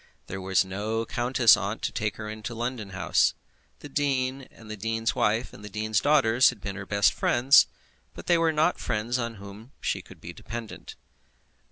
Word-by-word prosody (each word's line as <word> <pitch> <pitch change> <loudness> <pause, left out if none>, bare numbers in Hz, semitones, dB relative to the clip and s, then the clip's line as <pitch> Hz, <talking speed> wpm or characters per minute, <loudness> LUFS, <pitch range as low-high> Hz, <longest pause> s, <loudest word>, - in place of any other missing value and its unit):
There 95 +2 -6
was 95 0 +2
no 105 +4 -3
countess 120 0 +4
aunt 100 +2 -4
to - - -1
take 105 -3 -2
her 105 - -7
into 110 +2 -6
her - - -10
London 120 -3 -4
house. 95 -1 +1 0.5
The - - -8
dean 135 -2 -1
and 110 - -16
the 110 - -6
dean's 115 +2 -1
wife 115 0 0
and 105 - -13
the 105 - -8
dean's 110 0 -1
daughters 130 -5 +4
had 125 - -7
been 100 -1 -5
her 95 -1 -7
best 100 -2 +3
friends, 130 +4 +5 0.5
but - - -9
they 175 -1 +3
were 165 -1 +3
not 155 0 +1
friends 115 +4 -2
on 115 -1 -3
whom 100 +5 -12
she - - -2
could - - -16
be - - -9
dependent. 115 0 -8
115 Hz, 195 wpm, -26 LUFS, 105-125 Hz, 0.5 s, friends